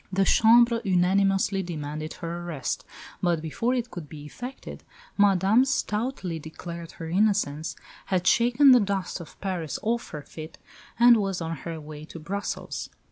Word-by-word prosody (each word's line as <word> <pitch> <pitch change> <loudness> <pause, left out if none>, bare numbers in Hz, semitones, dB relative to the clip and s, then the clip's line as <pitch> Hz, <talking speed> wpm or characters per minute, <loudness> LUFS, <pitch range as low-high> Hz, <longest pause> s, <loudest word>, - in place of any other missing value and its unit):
The 195 +1 +2
Chambre 235 +2 +5
unanimously 195 +1 +2
demanded 155 -3 -5
her 170 +1 -5
arrest; 155 -7 -3 0.4
but 175 -3 +2
before 165 - -1
it 245 -1 -3
could 165 -5 -8
be 145 0 -9
effected, 250 - -8 0.3
Madame, 200 +3 +4
stoutly 210 -8 -2
declaring 170 +2 -8
her 165 - -7
innocence, 175 -5 +1 0.3
had 180 -2 0
shaken 245 +7 +5
the 250 - +8
dust 195 -3 -2
of 170 - -12
Paris 180 -6 -3
off 235 +2 -1
her 150 -2 -7
feet, 155 +1 -10 0.4
and 240 0 +7
was 195 -3 -1
on 165 -1 -3
her 165 +3 -6
way 150 0 -9
to 165 - -10
Brussels. 195 +6 -4
185 Hz, 150 wpm, -26 LUFS, 160-215 Hz, 0.4 s, the